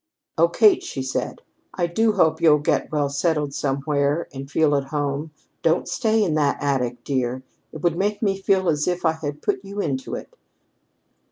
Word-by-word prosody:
"Oh, 165 Hz, +1 st, +4 dB
Kate," 210 Hz, +3 st, +5 dB
she 135 Hz, -, -5 dB
said, 130 Hz, -, -3 dB, 0.3 s
"I 175 Hz, -, +1 dB
do 215 Hz, +6 st, +1 dB
hope 165 Hz, -5 st, +2 dB
you'll 155 Hz, -3 st, +6 dB
get 145 Hz, -, 0 dB
well 150 Hz, -2 st, +1 dB
settled 145 Hz, 0 st, 0 dB
somewhere 140 Hz, +3 st, 0 dB
and 135 Hz, 0 st, -7 dB
feel 150 Hz, -1 st, +2 dB
at 140 Hz, -1 st, 0 dB
home. 145 Hz, +1 st, -2 dB, 0.3 s
Don't 165 Hz, +1 st, +1 dB
stay 220 Hz, -2 st, +1 dB
in 170 Hz, -6 st, 0 dB
that 150 Hz, -2 st, +2 dB
attic, 125 Hz, -4 st, -1 dB
dear. 130 Hz, -1 st, -2 dB, 0.3 s
It 155 Hz, -, -9 dB
would 170 Hz, -2 st, +2 dB
make 205 Hz, +3 st, 0 dB
me 195 Hz, -3 st, 0 dB
feel 190 Hz, -1 st, +2 dB
as 150 Hz, -2 st, +1 dB
if 180 Hz, -1 st, -1 dB
I 160 Hz, -, +5 dB
had 150 Hz, -2 st, -6 dB
put 400 Hz, -1 st, -1 dB
you 200 Hz, +1 st, -7 dB
into 135 Hz, -8 st, -2 dB
it." -, -, -9 dB
155 Hz, 185 wpm, -23 LUFS, 140-180 Hz, 0.3 s, you'll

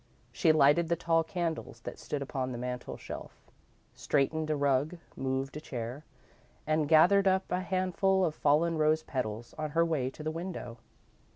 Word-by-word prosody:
She 160 Hz, +6 st, +3 dB
lighted 155 Hz, +2 st, +4 dB
the 170 Hz, -, +3 dB
tall 165 Hz, -1 st, +2 dB
candles 165 Hz, -1 st, -4 dB
that -, -, -7 dB
stood 145 Hz, -2 st, -3 dB
upon 130 Hz, -1 st, -3 dB
the 120 Hz, -, -4 dB
mantel 125 Hz, 0 st, -5 dB
shelf, -, -, -10 dB, 0.4 s
straightened 155 Hz, +3 st, 0 dB
a 155 Hz, -, +2 dB
rug, 145 Hz, +4 st, +1 dB, 0.2 s
moved 135 Hz, +1 st, -2 dB
a 150 Hz, -, -5 dB
chair, 125 Hz, +1 st, -6 dB, 0.6 s
and 155 Hz, -1 st, +1 dB
gathered 180 Hz, +5 st, +6 dB
up 190 Hz, 0 st, +1 dB
a 180 Hz, -, +1 dB
handful 185 Hz, 0 st, +1 dB
of 160 Hz, -, -1 dB
fallen 155 Hz, +3 st, +2 dB
rose 155 Hz, +1 st, +3 dB
petals 120 Hz, -3 st, -4 dB
on 155 Hz, 0 st, -2 dB
her 165 Hz, -, +5 dB
way 150 Hz, -6 st, 0 dB
to 155 Hz, -, -10 dB
the 155 Hz, -, -1 dB
window. 165 Hz, -8 st, -6 dB
155 Hz, 170 wpm, -30 LUFS, 135-170 Hz, 0.6 s, gathered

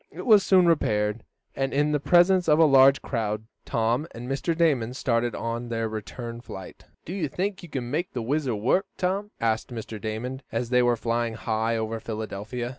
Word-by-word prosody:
It -, -, -9 dB
was 215 Hz, -4 st, +7 dB
soon 185 Hz, -2 st, +4 dB
repaired, 105 Hz, -9 st, +1 dB, 0.3 s
and, 135 Hz, 0 st, -1 dB
in 150 Hz, +1 st, +2 dB
the 150 Hz, -, +1 dB
presence 175 Hz, +5 st, +4 dB
of 150 Hz, -, +5 dB
a 165 Hz, -, +6 dB
large 135 Hz, -1 st, +6 dB
crowd, 110 Hz, -3 st, -2 dB, 0.2 s
Tom 120 Hz, +6 st, 0 dB
and 120 Hz, +1 st, -7 dB
Mr. 140 Hz, +5 st, -1 dB
Damon 130 Hz, -8 st, +2 dB
started 120 Hz, -3 st, 0 dB
on 115 Hz, +1 st, -4 dB
their 115 Hz, -1 st, -1 dB
return 115 Hz, +2 st, -6 dB
flight. 95 Hz, -6 st, -10 dB, 0.2 s
"Do 170 Hz, -, -6 dB
you 185 Hz, -6 st, -1 dB
think 190 Hz, +7 st, -3 dB
you 175 Hz, -, -11 dB
can 125 Hz, -4 st, -4 dB
make 170 Hz, +5 st, -2 dB
the 120 Hz, -, -3 dB
WHIZZER 135 Hz, -1 st, 0 dB
work, 130 Hz, -, +1 dB
Tom?" 195 Hz, +3 st, -1 dB
asked 110 Hz, -1 st, 0 dB
Mr. 110 Hz, -3 st, -7 dB
Damon, 120 Hz, +5 st, -4 dB
as 115 Hz, +2 st, -2 dB
they 125 Hz, 0 st, +5 dB
were 120 Hz, -1 st, +2 dB
flying 115 Hz, 0 st, -1 dB
high 115 Hz, +1 st, -1 dB
over 110 Hz, 0 st, -3 dB
Philadelphia. 110 Hz, +2 st, -5 dB
120 Hz, 190 wpm, -26 LUFS, 115-150 Hz, 0.3 s, was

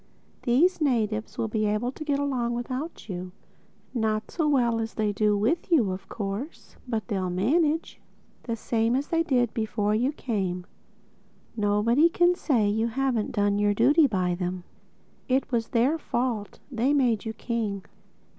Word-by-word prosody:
These 315 Hz, +9 st, +3 dB
natives 220 Hz, -6 st, 0 dB
will 225 Hz, -, 0 dB
be 215 Hz, -1 st, 0 dB
able 210 Hz, +4 st, 0 dB
to 310 Hz, -, -8 dB
get 290 Hz, -2 st, 0 dB
along 255 Hz, -4 st, -1 dB
without 255 Hz, +6 st, -5 dB
you—not 215 Hz, +4 st, -5 dB
so 315 Hz, -3 st, 0 dB
well 240 Hz, -5 st, +2 dB
as 225 Hz, 0 st, -4 dB
they 215 Hz, -1 st, +1 dB
do 210 Hz, 0 st, +2 dB
with 275 Hz, -, 0 dB
you 240 Hz, -, +4 dB
of 190 Hz, +1 st, -7 dB
course—but 225 Hz, +1 st, -5 dB
they'll 190 Hz, -5 st, -1 dB
manage—the 285 Hz, -, -2 dB
same 230 Hz, +1 st, 0 dB
as 275 Hz, +2 st, -2 dB
they 330 Hz, 0 st, +2 dB
did 250 Hz, -8 st, +1 dB
before 215 Hz, -2 st, 0 dB
you 245 Hz, +6 st, +1 dB
came. 190 Hz, -10 st, -3 dB, 0.9 s
Nobody 220 Hz, +8 st, +3 dB
can 350 Hz, +1 st, +3 dB
say 250 Hz, -11 st, +1 dB
you 220 Hz, +3 st, +1 dB
haven't 245 Hz, -2 st, -1 dB
done 205 Hz, -2 st, +1 dB
your 205 Hz, 0 st, +2 dB
duty 285 Hz, +8 st, +5 dB
by 185 Hz, -6 st, 0 dB
them. 180 Hz, 0 st, -3 dB, 0.6 s
It 265 Hz, +1 st, +1 dB
was 230 Hz, -2 st, 0 dB
their 260 Hz, +7 st, +2 dB
fault: 240 Hz, -7 st, -2 dB
they 255 Hz, +3 st, +1 dB
made 240 Hz, -7 st, +2 dB
you 220 Hz, -, -4 dB
king. 215 Hz, -5 st, -3 dB
230 Hz, 150 wpm, -26 LUFS, 210-270 Hz, 0.9 s, duty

